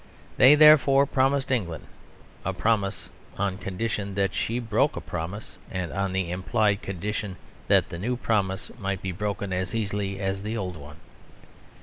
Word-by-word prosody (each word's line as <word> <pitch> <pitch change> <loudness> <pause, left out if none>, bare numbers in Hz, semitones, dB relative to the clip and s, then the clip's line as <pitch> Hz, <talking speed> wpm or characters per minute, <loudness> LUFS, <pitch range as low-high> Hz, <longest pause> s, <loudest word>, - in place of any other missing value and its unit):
They 135 +3 +8
therefore 145 -2 +7
promised 135 0 +1
England 90 - -2 0.6
a 95 - -2
promise, 100 0 -1 0.3
on 100 -1 -1
condition 100 0 -3
that 100 -1 +1
she 115 - -1
broke 115 -3 +1
a - - -3
promise, 90 +7 -6
and 90 -3 -3
on 100 -1 -1
the 95 -2 -1
implied 105 +3 +1
condition 100 +1 -4 0.3
that - - +4
the 85 - -6
new 120 +6 -1
promise 100 -5 -1
might 100 -2 -3
be 95 - -2
broken 100 0 -3
as 95 +4 -2
easily 100 -2 -2
as 95 -1 -2
the 110 +3 -3
old 90 -4 -4
one. 75 0 -11
100 Hz, 155 wpm, -26 LUFS, 95-115 Hz, 0.6 s, They